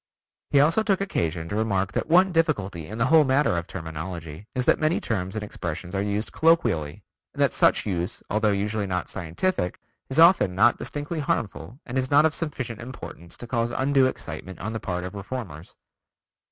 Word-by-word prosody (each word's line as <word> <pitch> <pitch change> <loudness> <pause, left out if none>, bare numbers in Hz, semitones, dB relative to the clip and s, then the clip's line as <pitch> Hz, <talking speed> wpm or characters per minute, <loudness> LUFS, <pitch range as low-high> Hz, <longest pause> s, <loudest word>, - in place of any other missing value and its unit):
He 140 - +4
also 155 +9 +4
took 205 -3 +1
occasion 85 - -2
to 100 - -3
remark 100 -3 0
that - - -2
one 185 +3 +5
difficulty 100 - 0
in 110 - -7
the 115 - +2
whole 160 +2 +6
matter 135 -5 +2
of 85 0 -3
terminology 80 +1 -7
is 125 -1 0
that - - +4
many 155 +2 +2
terms 95 -3 -3
and 110 - -3
expressions 90 -3 -6
are 95 - 0
used 105 +2 -2
colloquially 115 - +2 0.3
and - - -3
that - - +2
such - - +3
use 90 +1 -3
although 105 +1 +1
usually 105 +1 -1
not 90 -1 -2
scientific, 90 - -2 0.3
is 135 - -4
often 165 - +6
not 120 +5 +4
distinctly 145 +3 -4
harmful 115 - -3
and 130 +2 -2
is 130 0 -1
not 145 +2 +6
of 160 - +2
sufficient 130 -9 -4
importance 115 -8 -9
to - - -8
cause 115 -1 0
undue 135 +1 +3
excitement 95 -6 -6
on 110 +3 -4
the 110 - -3
part 90 -3 -3
of 90 - -6
reformers. 100 - -7
110 Hz, 190 wpm, -25 LUFS, 90-140 Hz, 0.3 s, whole